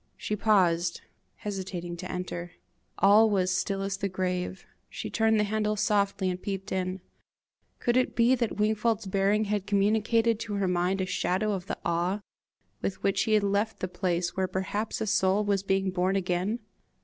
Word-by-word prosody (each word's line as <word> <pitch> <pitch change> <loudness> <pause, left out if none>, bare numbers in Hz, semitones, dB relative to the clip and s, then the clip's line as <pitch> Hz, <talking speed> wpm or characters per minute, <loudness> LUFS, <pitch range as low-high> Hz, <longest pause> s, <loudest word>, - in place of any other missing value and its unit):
She 210 - -2
paused, 180 -5 +2 0.3
hesitating 185 -4 -5
to 185 +2 -6
enter. 175 -1 -5 0.4
All 210 +3 +6
was 185 -3 +1
still 195 +1 -1
as 195 0 -2
the 200 0 -2
grave. 185 0 -3 0.2
She - - -6
turned 220 -1 +3
the - - +3
handle 210 0 0
softly 200 -2 +1
and 180 0 -2
peeped 195 -1 -4
in: 185 0 -2 0.8
could 240 - 0
it 255 0 +2
be 235 +2 +4
that 235 -4 -1
Wingfold's 215 +1 +1
bearing 195 +2 +2
had 205 -2 -2
communicated 220 +3 +2
to 210 -2 -4
her 200 -1 0
mind 180 +2 +1
a - - 0
shadow 185 +3 0
of 190 -2 -3
the - - -3
awe 175 +4 0 0.6
with 195 - -3
which 195 0 +2
he 220 - +1
had 210 -1 +4
left 205 +2 0
the 185 - -2
place 180 -1 -1
where 190 0 0
perhaps 195 +4 -3
a - - +1
soul 195 0 +2
was 200 -2 +1
being 195 -1 0
born 185 +1 +1
again? 190 +4 -1
195 Hz, 175 wpm, -28 LUFS, 185-210 Hz, 0.8 s, All